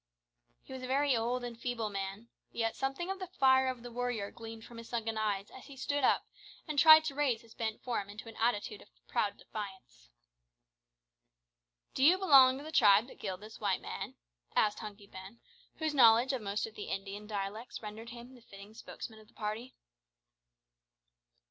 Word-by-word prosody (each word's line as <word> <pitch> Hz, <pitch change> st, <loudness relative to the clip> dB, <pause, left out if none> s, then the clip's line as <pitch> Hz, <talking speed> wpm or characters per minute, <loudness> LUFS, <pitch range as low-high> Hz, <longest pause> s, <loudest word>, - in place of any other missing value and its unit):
He -, -, -11 dB
was 260 Hz, -, -6 dB
a 255 Hz, -, -5 dB
very 275 Hz, +1 st, +2 dB
old 240 Hz, +2 st, -1 dB
and 240 Hz, -1 st, -5 dB
feeble 230 Hz, -2 st, -3 dB
man, 195 Hz, +3 st, -5 dB, 0.2 s
yet 225 Hz, -1 st, -1 dB
something 275 Hz, +7 st, -2 dB
of 385 Hz, -, -5 dB
the 370 Hz, -, -5 dB
fire 265 Hz, -6 st, +4 dB
of 255 Hz, -2 st, -3 dB
the 245 Hz, -, -8 dB
warrior 240 Hz, -4 st, -2 dB
gleamed 225 Hz, 0 st, -9 dB
from 235 Hz, -, -12 dB
his 230 Hz, 0 st, -10 dB
sunken 225 Hz, -2 st, -2 dB
eyes 205 Hz, -2 st, -1 dB
as 260 Hz, -, -12 dB
he 275 Hz, -, -12 dB
stood 285 Hz, +2 st, -1 dB
up -, -, +3 dB, 0.4 s
and 300 Hz, -2 st, 0 dB
tried 315 Hz, +1 st, +9 dB
to 300 Hz, -, -2 dB
raise 270 Hz, -6 st, 0 dB
his 225 Hz, -1 st, -17 dB
bent 220 Hz, -1 st, -4 dB
form 225 Hz, -5 st, -2 dB
into 215 Hz, +3 st, -9 dB
an 225 Hz, -, -10 dB
attitude 215 Hz, -2 st, 0 dB
of -, -, -17 dB, 0.2 s
proud 205 Hz, -, 0 dB
defiance. 190 Hz, -, -9 dB, 1.8 s
"Do 265 Hz, -, 0 dB
you 340 Hz, +6 st, +7 dB
belong 270 Hz, -8 st, +7 dB
to 280 Hz, -, -8 dB
the 310 Hz, -, -8 dB
tribe 210 Hz, -6 st, +6 dB
that -, -, -14 dB
killed 190 Hz, -2 st, -4 dB
this 215 Hz, +1 st, -11 dB
white 200 Hz, -3 st, 0 dB
man?" -, -, -6 dB, 0.4 s
said 210 Hz, -1 st, +4 dB
Hunky 210 Hz, -1 st, -9 dB
Ben, 195 Hz, +3 st, -11 dB, 0.4 s
whose 315 Hz, -2 st, -2 dB
knowledge 240 Hz, 0 st, +6 dB
of 260 Hz, -, -2 dB
most 205 Hz, 0 st, -2 dB
of 225 Hz, -, -10 dB
the 210 Hz, -, -7 dB
Indian 200 Hz, +2 st, -5 dB
dialects 210 Hz, +3 st, -5 dB
rendered 215 Hz, +2 st, -7 dB
him 240 Hz, +2 st, -10 dB
the 250 Hz, -, -16 dB
fitting 200 Hz, -1 st, -13 dB
spokesman 220 Hz, 0 st, -9 dB
of 215 Hz, -, -17 dB
the -, -, -26 dB
party. 220 Hz, +4 st, -5 dB
230 Hz, 190 wpm, -32 LUFS, 210-260 Hz, 1.8 s, tried